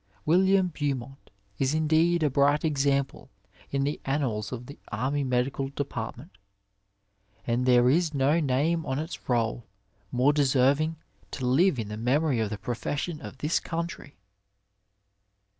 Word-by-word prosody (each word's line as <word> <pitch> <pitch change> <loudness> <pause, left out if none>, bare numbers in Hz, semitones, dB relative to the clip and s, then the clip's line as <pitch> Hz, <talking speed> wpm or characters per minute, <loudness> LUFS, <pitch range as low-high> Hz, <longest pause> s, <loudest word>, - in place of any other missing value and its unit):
William 190 +3 +4
Beaumont 135 -4 -4 0.3
b 135 - +2
indeed 160 +2 +2
a 150 - +3
bright 145 +3 +3
example 140 -2 0 0.4
in 140 0 0
the 145 +2 -2
annals 130 -7 -1
of 125 -1 -6
the 140 - -11
Army 130 +6 -1
Medical 130 +1 -1
Department, 140 +2 -6 1.1
and 120 +2 0
there 125 -1 +5
is 160 +4 +3
no 145 +3 +2
name 155 +4 +1
on 130 -3 -2
its 160 0 -6
roll 115 -1 0 0.4
more 130 +4 +3
deserving 145 +2 +2 0.3
to 130 - -5
live 150 +6 +3
in 110 -3 -4
the 105 - -5
memory 130 +3 +1
of 110 -2 0
the 105 - -4
profession 145 - -4
of - - -9
this 150 +5 0
country. 165 -3 -5
140 Hz, 140 wpm, -27 LUFS, 125-155 Hz, 1.1 s, there